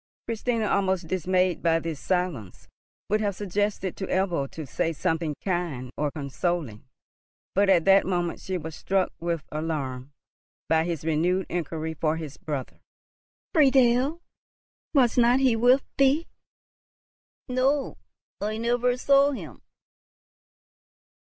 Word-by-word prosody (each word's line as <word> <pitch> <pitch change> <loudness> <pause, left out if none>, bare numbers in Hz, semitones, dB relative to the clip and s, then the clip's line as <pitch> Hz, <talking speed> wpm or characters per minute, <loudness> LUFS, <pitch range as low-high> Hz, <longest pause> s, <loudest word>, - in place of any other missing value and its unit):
Christina, 230 -1 -1
almost 190 -3 +1
dismayed 185 0 +1
by 165 -1 +3
this 165 -3 -4
silence, 180 - -2 0.4
would 215 +2 +1
have 200 -2 -1
suggested 205 -1 -2
to 190 - -4
Ebbo 175 -7 0
to 160 - -7
say 165 +4 -1
something 160 0 -1
kind 170 -10 -2
or 150 0 0
consoling; 140 - -3 0.7
but 200 +1 +3
at 175 -4 +4
that 195 -1 +5
moment 175 -2 -1
she 185 -1 -3
was 160 -2 -7
struck 190 -1 0
with 170 -2 -2
alarm 145 -4 -3 0.6
by 160 0 +2
his 165 -3 -3
renewed 170 +4 +1
inquiry 160 -2 -3
for 155 0 0
his 155 -3 -7
brother. 145 -4 -5 0.7
"Friedel! 270 +1 +4 0.7
Was 250 -3 +4
not 245 +2 +5
he 260 -3 +3
with 245 +4 +4 0.2
thee?" 275 +5 +4 1.2
"No; 265 +2 0 0.4
I 215 +1 -2
never 245 +2 +1
saw 280 +2 +4
him!" - - -8
185 Hz, 125 wpm, -26 LUFS, 160-230 Hz, 1.2 s, that